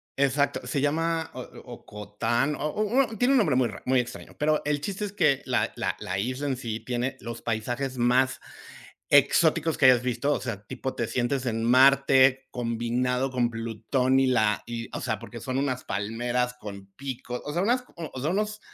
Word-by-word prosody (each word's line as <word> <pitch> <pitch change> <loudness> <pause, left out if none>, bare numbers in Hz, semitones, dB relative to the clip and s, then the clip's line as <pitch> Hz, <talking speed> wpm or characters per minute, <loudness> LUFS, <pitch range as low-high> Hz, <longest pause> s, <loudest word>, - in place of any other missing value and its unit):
Exacto. 140 +1 +1
Se 140 -4 -1
llama 160 +2 0
O 125 - -6 0.2
Ocotán, 120 +4 -2
o 150 - -2
o 220 - 0
tiene 250 +4 +3
un - - +5
nombre 155 - +3
muy 130 -2 +3
rar - - -9
muy 130 0 +3
extraño, 120 0 -6
pero 155 +1 +2
el 145 -1 0
chiste 200 +4 -3
es 200 - -7
que 145 -9 +2
la - - 0
la - - -2
la 95 +1 -3
isla 130 +7 -2
en 130 -2 -1
sí 115 -3 -4
tiene 125 +2 -3
los 120 0 -7
paisajes 120 +4 -2
más 125 +2 +2 0.7
exóticos 155 +3 +4
que 140 - +3
hayas 125 -2 +7
visto, 130 +4 0
o - - -2
sea, 105 -5 -5
tipo 130 +1 -5
te 115 - -2
sientes 125 +2 -1
en 115 -1 -1
Marte 130 +1 +5
combinado 125 +2 -1
con 125 -2 +1
Plutón 115 +4 0
y 135 - +3
la 110 -4 +2
y, 115 -1 -5
o - - -6
sea, 110 - -2
porque 115 0 -9
son 130 -1 -3
unas 130 -2 -1
palmeras 120 +5 -1
con 100 -3 -9
pico, 130 -2 -5
o 145 - -4
sea, 175 - 0
unas, 245 +5 +1 0.3
o - - -3
sea, 155 +4 0
unos 210 +2 -1
130 Hz, 190 wpm, -26 LUFS, 120-145 Hz, 0.7 s, hayas